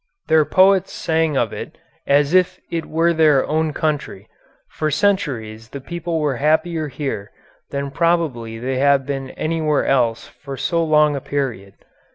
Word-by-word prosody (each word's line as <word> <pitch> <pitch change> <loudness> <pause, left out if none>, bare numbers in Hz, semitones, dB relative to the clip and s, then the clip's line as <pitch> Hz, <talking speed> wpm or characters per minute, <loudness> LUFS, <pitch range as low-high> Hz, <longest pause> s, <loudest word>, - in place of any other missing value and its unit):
Their 160 -1 +5
poets 190 +2 +4
sang 160 -3 0
of 115 -4 0
it - - -8 0.3
as 145 +2 +3
if 185 0 +3
it 165 -1 -3
were 165 +2 +2
their 155 -4 +4
own 155 +1 0
country; 145 -10 -3 0.4
for 155 - -2
centuries 135 - -1
the 140 - -7
people 170 +3 -4
were 145 -4 0
happier 155 +2 +1
here 135 -7 -5 0.4
than 140 0 -4
probably 145 -9 0
they 130 +2 -2
have 140 -1 +3
been 135 -1 -4
anywhere 155 0 -1
else 120 -4 +1
for 140 -1 -9
so 165 +5 0
long 150 -2 +3
a 140 - -4
period. 125 -10 -4
150 Hz, 155 wpm, -20 LUFS, 135-165 Hz, 0.4 s, Their